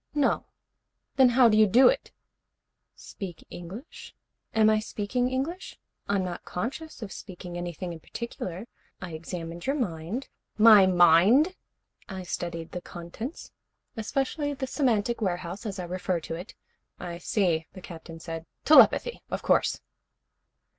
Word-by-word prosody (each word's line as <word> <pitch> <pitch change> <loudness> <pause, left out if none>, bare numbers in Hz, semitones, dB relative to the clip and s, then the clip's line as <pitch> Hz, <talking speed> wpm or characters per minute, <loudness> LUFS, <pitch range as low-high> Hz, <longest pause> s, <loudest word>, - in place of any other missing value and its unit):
"No." 290 -2 +2 0.7
"Then 260 -2 +6
how 245 0 +6
do 215 - +4
you 215 0 +6
do 245 +7 +6
it?" - - +1 0.8
"Speak 180 -5 -9
English? 190 - -10 0.4
Am 220 -1 +4
I 215 0 +4
speaking 220 +4 -2
English? 285 +9 -4 0.3
I'm 200 -2 +1
not 180 -1 -5
conscious 260 - -5
of 200 - -7
speaking 180 -1 -9
anything 175 0 -5
in 165 - -9
particular. 190 -1 -6 0.3
I 180 - -7
examined 165 +2 -6
your 275 - +2
mind 195 - -3 0.2
" - - -45
"My 200 -3 +8
mind?" 185 - +5 0.5
"I 190 -2 -6
studied 170 -2 -5
the 180 - -5
contents, 175 - -8 0.4
especially 275 +6 -2
the 265 - -3
semantic 240 -5 0
warehouse, 185 +2 -3
as 200 -1 -5
I 180 - -4
refer 180 0 -2
to 160 - -6
it 175 +6 -8 0.2
" - - -45
"I 170 0 -6
see," 175 -4 0
the 185 - -10
Captain 165 -1 -10
said. 165 0 -7 0.2
"Telepathy. 315 +9 +6
Of - - -4
course." - - +2
195 Hz, 145 wpm, -27 LUFS, 175-245 Hz, 0.8 s, My